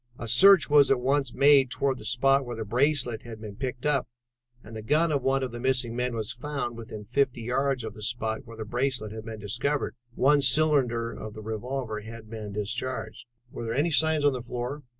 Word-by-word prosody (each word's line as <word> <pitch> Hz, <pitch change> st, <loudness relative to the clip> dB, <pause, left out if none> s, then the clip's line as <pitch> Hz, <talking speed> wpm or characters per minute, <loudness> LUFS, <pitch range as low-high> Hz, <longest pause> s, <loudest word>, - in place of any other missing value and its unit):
A 115 Hz, -, -6 dB
search 195 Hz, -, +7 dB
was 145 Hz, -1 st, +5 dB
at 135 Hz, -, +3 dB
once 135 Hz, 0 st, 0 dB
made 140 Hz, -1 st, +5 dB
toward 135 Hz, +1 st, -1 dB
the 105 Hz, -, -10 dB
spot 135 Hz, +4 st, +3 dB
where 120 Hz, -2 st, -6 dB
the 110 Hz, -1 st, -5 dB
bracelet 125 Hz, 0 st, +1 dB
had 115 Hz, -2 st, -10 dB
been 105 Hz, -2 st, -8 dB
picked 125 Hz, +2 st, -5 dB
up, 140 Hz, -5 st, +1 dB, 0.6 s
and 110 Hz, +1 st, -11 dB
the 110 Hz, -, -5 dB
gun 155 Hz, +8 st, +2 dB
of 140 Hz, -2 st, 0 dB
one 135 Hz, +1 st, +1 dB
of 130 Hz, -, -3 dB
the 120 Hz, -, -7 dB
missing 125 Hz, -2 st, +1 dB
men 125 Hz, 0 st, -2 dB
was 110 Hz, -2 st, -3 dB
found 140 Hz, -2 st, -4 dB
within 110 Hz, -2 st, -9 dB
fifty 125 Hz, +1 st, 0 dB
yards 130 Hz, +1 st, 0 dB
of 110 Hz, -2 st, -6 dB
the 110 Hz, -, -12 dB
spot 110 Hz, +1 st, -2 dB
where 115 Hz, 0 st, -11 dB
the 110 Hz, -, -5 dB
bracelet 120 Hz, -1 st, -2 dB
had 110 Hz, 0 st, -8 dB
been 110 Hz, -1 st, -7 dB
discovered. 140 Hz, +8 st, -1 dB, 0.2 s
One 145 Hz, +2 st, +4 dB
cylinder 130 Hz, -4 st, +3 dB
of 110 Hz, -1 st, -8 dB
the 110 Hz, -, -8 dB
revolver 110 Hz, +1 st, -4 dB
had 110 Hz, 0 st, -11 dB
been 110 Hz, -2 st, -6 dB
discharged." 115 Hz, +6 st, -4 dB, 0.2 s
"Were -, -, -7 dB
there 115 Hz, +1 st, -3 dB
any 155 Hz, +5 st, +1 dB
signs 160 Hz, -1 st, +3 dB
on 145 Hz, -, +4 dB
the 125 Hz, -, -4 dB
floor?" 125 Hz, +4 st, -5 dB
125 Hz, 215 wpm, -27 LUFS, 110-140 Hz, 0.6 s, search